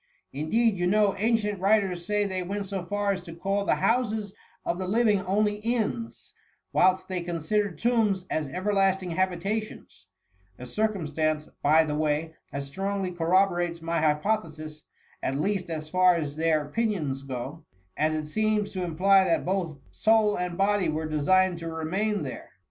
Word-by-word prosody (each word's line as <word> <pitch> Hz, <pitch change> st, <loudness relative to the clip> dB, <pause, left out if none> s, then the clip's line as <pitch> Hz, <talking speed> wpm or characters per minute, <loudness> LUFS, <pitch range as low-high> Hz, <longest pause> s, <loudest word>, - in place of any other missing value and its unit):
Indeed, 200 Hz, -, +1 dB
you 175 Hz, 0 st, 0 dB
know, 205 Hz, +1 st, +3 dB
ancient 210 Hz, -2 st, +1 dB
writers 195 Hz, -3 st, +2 dB
say 210 Hz, +2 st, 0 dB
they 190 Hz, -2 st, -2 dB
went 200 Hz, +3 st, -3 dB
so 195 Hz, -2 st, -4 dB
far 205 Hz, +3 st, -1 dB
as 190 Hz, -2 st, -2 dB
to 170 Hz, -2 st, -10 dB
call 195 Hz, +3 st, -1 dB
the -, -, +3 dB
houses 220 Hz, -4 st, 0 dB, 0.3 s
of 170 Hz, -, -1 dB
the 185 Hz, -, -3 dB
living 210 Hz, -1 st, +3 dB
only 210 Hz, +2 st, +1 dB
inns, 230 Hz, +1 st, -3 dB, 0.4 s
whilst 185 Hz, 0 st, +3 dB
they 185 Hz, -2 st, -3 dB
considered 175 Hz, +2 st, -1 dB
tombs 215 Hz, -4 st, +1 dB
as 150 Hz, -6 st, -2 dB
everlasting 190 Hz, 0 st, +1 dB
habitations; 185 Hz, -, -3 dB, 0.3 s
— 95 Hz, 0 st, -37 dB
a 125 Hz, -, -8 dB
circumstance, 155 Hz, -, -1 dB
by 155 Hz, +3 st, +5 dB
the 150 Hz, -1 st, -3 dB
way, 155 Hz, +1 st, -1 dB, 0.2 s
that 140 Hz, -, -3 dB
strongly 195 Hz, +6 st, -3 dB
corroborates 175 Hz, 0 st, +1 dB
my 165 Hz, 0 st, -1 dB
hypo 155 Hz, +8 st, +2 dB
thesis, 155 Hz, -2 st, -10 dB, 0.4 s
at 135 Hz, -, -1 dB
least 185 Hz, +4 st, -1 dB
as 155 Hz, -2 st, -4 dB
far 185 Hz, +2 st, +4 dB
as 150 Hz, -4 st, -3 dB
their 155 Hz, -1 st, +1 dB
opinions 155 Hz, -7 st, -1 dB
go; 135 Hz, +4 st, -6 dB, 0.3 s
as 155 Hz, +1 st, +1 dB
it 155 Hz, -1 st, -3 dB
seems 215 Hz, +4 st, 0 dB
to 185 Hz, -2 st, -3 dB
imply 190 Hz, +3 st, +4 dB
that 170 Hz, -3 st, +1 dB
both 180 Hz, -5 st, -1 dB
soul 220 Hz, -1 st, +3 dB
and 180 Hz, -1 st, -3 dB
body 195 Hz, -3 st, +2 dB
were 155 Hz, +1 st, -2 dB
designed 175 Hz, +4 st, +2 dB
to 165 Hz, 0 st, -5 dB
remain 190 Hz, +7 st, -1 dB
there. -, -, -7 dB
185 Hz, 165 wpm, -27 LUFS, 160-205 Hz, 0.4 s, by